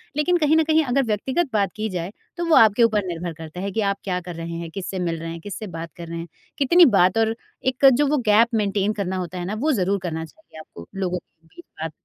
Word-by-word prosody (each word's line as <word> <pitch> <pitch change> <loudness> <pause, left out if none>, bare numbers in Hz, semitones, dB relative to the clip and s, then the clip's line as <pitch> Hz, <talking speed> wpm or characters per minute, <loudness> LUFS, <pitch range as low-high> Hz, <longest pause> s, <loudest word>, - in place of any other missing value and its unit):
लेकिन 350 +4 +2
कहीं 310 -1 +3
न 320 - +4
कहीं 315 0 +3
अगर 270 +2 +1
व्यक्तिगत 260 - -1
बात 200 -2 +1
की 215 0 -3
जाए 180 0 -4 0.3
तो 345 - -2
वो 330 -2 +4
आपके 220 +1 +6
ऊपर 215 -3 +2
निर्भर 170 -1 -4
करता 160 +1 -9
है 200 - -3
कि 220 - -1
आप 200 -1 0
क्या 180 -2 -1
कर 175 -1 -8
रहे 165 0 -6
हैं? 170 0 -6
किससे 190 +1 -5
मिल 170 -2 -2
रहे 165 +1 -6
हैं? 165 - -7
किससे 205 +3 -6
बात 165 -2 -7
कर 170 - -8
रहे 170 0 -6
हैं? 165 - -6 0.3
कितनी 340 +5 +6
बात 180 +5 +4
और 225 0 +2 0.3
एक 260 +1 +1
जो 290 +4 +2
वो 295 +2 +2
गैप 215 +2 +5
मेंटेन 205 -1 0
करना 190 -3 -3
होता 180 0 -5
है 175 - -4
ना 195 - -3
वो 305 +5 +1
ज़रूर 200 -5 +1
करना 160 -2 -3
चाहिए 235 - -16
आपको 85 - -12
लोगों 185 -2 -1
के 165 -1 -38
बीच 345 - -12 0.2
बात 160 -1 -3
200 Hz, 260 wpm, -23 LUFS, 175-245 Hz, 0.3 s, आपके